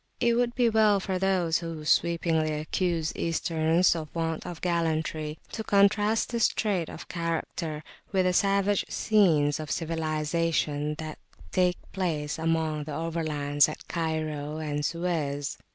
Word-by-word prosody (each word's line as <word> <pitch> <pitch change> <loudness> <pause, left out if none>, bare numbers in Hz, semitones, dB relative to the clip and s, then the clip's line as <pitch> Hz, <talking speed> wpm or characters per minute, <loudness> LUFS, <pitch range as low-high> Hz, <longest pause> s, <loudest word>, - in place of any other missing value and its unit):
It 235 -1 +3
would 240 0 +1
be 245 -2 +3
well 215 -2 +4
for 190 -1 -2
those 180 -4 +2
who 165 -3 -6
sweepingly 165 -1 +2
accuse 165 +1 -1
Easterns 165 +1 +2
of 160 -2 -4
want 165 0 -2
of 175 -2 -6
gallantry, 160 -3 -1
to 220 - -4
contrast 205 +2 +3
this 235 -2 +3
trait 190 -7 -1
of - - -9
character 165 -2 -3 0.3
with 190 -2 +2
the 180 - +2
savage 200 +1 +2
scenes 160 -10 +3
of 155 -1 -6
civilisation 155 -2 -1
that 155 0 -7 0.3
take 180 -1 +2
place 160 -5 -2
among 160 -2 0
the 150 - -6
"Overlands" 155 -3 +1
at 155 - -9
Cairo 155 -2 -2
and 150 -2 -2
Suez. 150 -4 -2
165 Hz, 135 wpm, -27 LUFS, 155-185 Hz, 0.3 s, well